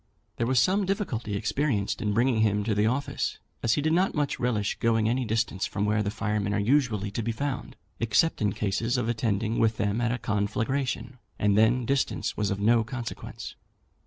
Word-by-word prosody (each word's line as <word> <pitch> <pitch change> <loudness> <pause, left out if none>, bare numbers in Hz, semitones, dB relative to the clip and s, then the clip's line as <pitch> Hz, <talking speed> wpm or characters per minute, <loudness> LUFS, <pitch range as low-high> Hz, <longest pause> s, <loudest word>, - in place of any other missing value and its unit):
There 115 - 0
was 130 -1 +3
some 190 - +2
difficulty 125 - -2
experienced 115 -2 -1
in 105 -2 0
bringing 120 0 +2
him 105 -1 +2
to 110 +1 0
the 105 +1 +2
office, 130 +5 -1 0.2
as 115 - +2
he 145 - 0
did 155 +1 +2
not 185 +3 +2
much 145 -2 -1
relish 110 -5 -1
going 115 -1 +2
any 125 +2 0
distance 110 -3 -1
from 100 0 -2
where 105 +1 +2
the 100 - -1
firemen 105 -1 -1
are - - +1
usually 110 -4 +1
to 115 - -2
be 115 +1 -1
found, 135 +1 -4 0.2
except 115 +8 +2
in 105 -1 +2
cases 115 +5 -1
of 120 - -1
attending 110 -1 0
with 110 -1 +2
them 105 +2 0
at 115 -1 +1
a 125 - -1
conflagration, 120 +4 -2 0.2
and 105 -1 +2
then 115 +3 +3
distance 125 -4 0
was 105 -2 0
of 100 - -2
no 115 +2 +4
consequence. 120 0 -6
115 Hz, 195 wpm, -27 LUFS, 105-125 Hz, 0.2 s, no